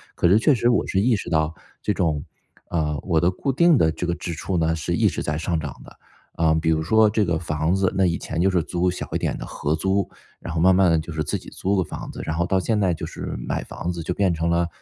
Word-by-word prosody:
可 85 - +2
是 95 +5 +6
确 145 +6 +4
实 120 -1 +1
我 120 - +2
是 95 - 0
意 115 +2 +3
识 100 - -5
到 80 0 +1 0.3
这 105 - 0
种， 80 -6 -1 0.4
呃， 75 -4 -1
我 85 -3 +1
的 90 +2 +3
固 135 +9 -4
定 170 0 +5
的 80 - +4
这 80 +3 -3
个 85 - 0
支 85 0 -5
出 90 +3 -3
呢 80 0 +1
是 80 - -3
一 - - +3
直 - - -2
在 75 0 -1
上 80 +1 -1
涨 75 -3 -7
的。 - - -16 0.4
啊， 80 -1 +2
比 80 - +1
如 80 0 +1
说 110 +3 +4
这 105 0 +1
个 85 -2 0
房 80 +1 -1
子， 95 -1 +1
那 95 - +4
以 85 -1 +1
前 85 +1 -3
就 95 - +4
是 90 -3 +2
租 90 +1 0
小 - - -5
一 - - +2
点 - - -2
的 - - -6
合 75 - -2
租， 95 +3 0 0.3
然 85 - -6
后 80 - -1
慢 95 +1 +6
慢 95 -2 +4
地 80 - +3
就 80 +1 -7
是 75 -1 -1
自 - - -2
己 - - -11
租 100 +1 -1
个 95 - +2
房 - - -7
子， - - -7
然 80 - -3
后 85 +1 +1
到 95 +1 +1
现 105 +3 0
在 90 -3 +2
就 80 - -5
是 - - -6
买 - - -3
房 90 - -5
子， 85 - -5
就 90 - -2
变 95 -3 +1
成 80 +1 -1
了 85 0 +2
85 Hz, 310 characters per minute, -23 LUFS, 80-95 Hz, 0.4 s, 是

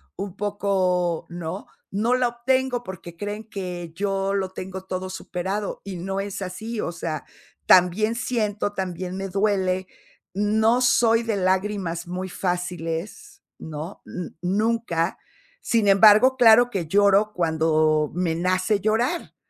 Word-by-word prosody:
un 200 -1 -6
poco 185 -4 0
¿no?, 175 +2 -6 0.3
no 225 +5 +1
la 250 -1 +2
obtengo 250 +1 0
porque 175 -2 -9
creen 205 +3 -6
que 180 -4 -5
yo 195 +1 -1
lo 190 -2 -1
tengo 190 0 -7
todo 185 0 -4
superado 190 +2 -4
y 195 -2 -6
no 195 +3 -3
es 200 0 -5
así, 210 +5 -5
o 175 - -2
sea, 165 -3 -4 0.4
también 185 +5 +5
siento, 215 -3 -1
también 185 -1 -4
me 195 0 -4
duele. 190 -2 0 0.5
No 220 +4 +2
soy 235 -2 +4
de 225 -2 -1
lágrimas 185 -2 -1
muy 180 +1 -4
fáciles, 180 -1 -4 0.2
¿no?, 160 +4 -7
n 180 -2 -6
nunca. 195 -2 0 0.4
Sin 225 -3 +1
embargo, 215 +6 +7
claro 240 0 +7
que 190 -8 -3
lloro 200 +3 +4
cuando 155 -2 +2
me 175 -1 0
nace 185 +4 +1
llorar, 235 - 0
195 Hz, 130 wpm, -24 LUFS, 180-215 Hz, 0.5 s, embargo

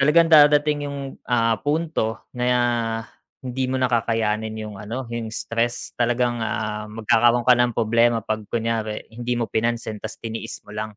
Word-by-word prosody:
talagang 165 +4 +5
dadating 150 -1 +5
yung, 140 - -5 0.3
ah, 115 -2 +3
punto 150 -7 -1
na 120 -2 0 0.4
hindi 130 +1 -2
mo 130 - 0
na 130 -1 0
kakayanin 110 -1 0
'yong 105 -2 -7
ano, 115 +5 -5
'yong 115 -1 -3
stress, 115 +1 -2
talagang, 120 0 +1
ah, 110 -1 -3
magkakaroon 115 +2 +3
ka 125 - +7
ng 120 -1 +3
problema 115 0 +2
'pag 110 0 -2
kunyari 110 -2 -2
hindi 120 +1 -2
mo 120 - 0
pinansin, 115 -1 -1
'tas 110 - -6
tiniis 115 -1 -6
mo 105 - -12
lang. 105 0 -5
115 Hz, 160 wpm, -23 LUFS, 110-125 Hz, 0.4 s, ka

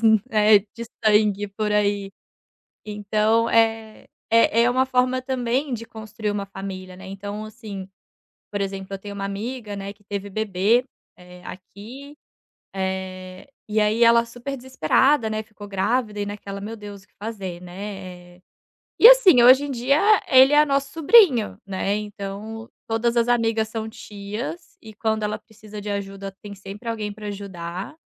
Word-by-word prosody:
famílias, - - -17 0.3
né, 215 -1 +6
de 220 +3 -10 0.2
sangue 210 -1 +3
por 210 +1 -3
aí. 205 -1 0 0.8
Então, 215 +2 +1
eh, 225 -1 +1 0.2
é 230 0 +4
é 245 - +3
uma 255 +1 +2
forma 255 0 +1
também 255 +1 -1
de 230 0 -5
construir 215 -1 -5
uma 200 -1 -3
família, 190 -1 -8
né. 190 - -11
Então 205 +2 -6
assim, 205 -3 -8 0.6
por 205 - -3
exemplo, 195 -1 -4
eu 195 - -5
tenho 205 0 -8
uma 195 0 -4
amiga, 210 +2 -5
né, 200 0 -6
que 205 0 -29
teve 200 0 -5
bebê, 215 +3 +1 0.3
eh, 180 0 -14
aqui, 245 +10 -11 0.6
eh, 190 +2 -5 0.2
e 215 +1 0
aí 215 +2 +3
ela 235 0 +5
super 245 +4 -6
desesperada, 260 - +2
né, 215 0 -2
ficou 215 -2 -12
grávida 210 +2 -1
e 205 - -1
naquela: 200 -1 -7
"Meu 215 +3 -6
Deus 205 -2 -10
o - - -27
que - - -39
fazer?", 195 -5 -6
né, 180 -1 -9
eh, - - -26 0.6
e 460 - +10
assim, 410 - +7
hoje 260 +3 +7
em 290 - -4
dia 265 +4 +1 0.3
ele 265 +2 +7
é 300 +1 +6
nosso 275 -1 -1
sobrinho, 320 - +4
né, 195 +1 -1
então 210 +2 -7 0.2
todas 230 +1 0
as 235 0 +3
amigas 225 -2 +1
são 220 0 -5
tias 215 - -7
e 220 -1 -12
quando 220 0 -1
ela 210 0 -2
precisa 215 -1 -12
de 205 0 -5
ajuda 195 -1 -5
tem 205 -1 -9
sempre 200 +4 -9
alguém 215 -2 -3
para 210 0 -9
ajudar. 190 - -6
210 Hz, 165 wpm, -23 LUFS, 200-235 Hz, 0.8 s, e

